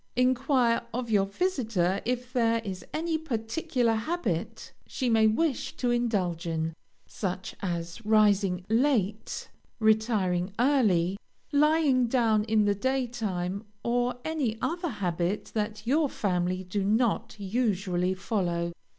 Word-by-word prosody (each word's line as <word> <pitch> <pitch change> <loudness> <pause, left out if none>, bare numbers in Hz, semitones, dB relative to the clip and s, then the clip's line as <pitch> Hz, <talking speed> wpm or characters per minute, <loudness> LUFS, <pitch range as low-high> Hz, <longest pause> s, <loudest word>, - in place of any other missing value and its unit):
Enquire 250 -1 +2
of 240 -2 -3
your 195 -2 +3
visitor 215 - 0
if 250 +1 -2
there 230 -2 +2
is 185 -2 -5
any 320 0 -1
particular 245 -2 -1
habit 220 - -3
she 255 -3 -1
may 220 -1 +5
wish 270 +5 0
to 245 -1 0
indulge 195 -8 0
in, 160 0 -1 0.3
such 185 -2 -4
as 170 +3 -4
rising 205 -4 +3
late, 220 -4 0 0.3
retiring 215 -5 +2
early, 210 -9 +3 0.3
lying 295 -4 +3
down 225 -3 +2
in 220 -1 +3
the 205 - +3
daytime, 215 -6 -2 0.2
or 245 +1 +1
any 285 -9 -1
other 345 +5 -2
habit 180 - -2
that 210 0 -3
your 290 +4 +2
family 185 -3 -1
do 190 +2 -2
not 220 +3 +1
usually 190 -4 0
follow. 175 -4 -1
220 Hz, 120 wpm, -28 LUFS, 190-250 Hz, 0.3 s, may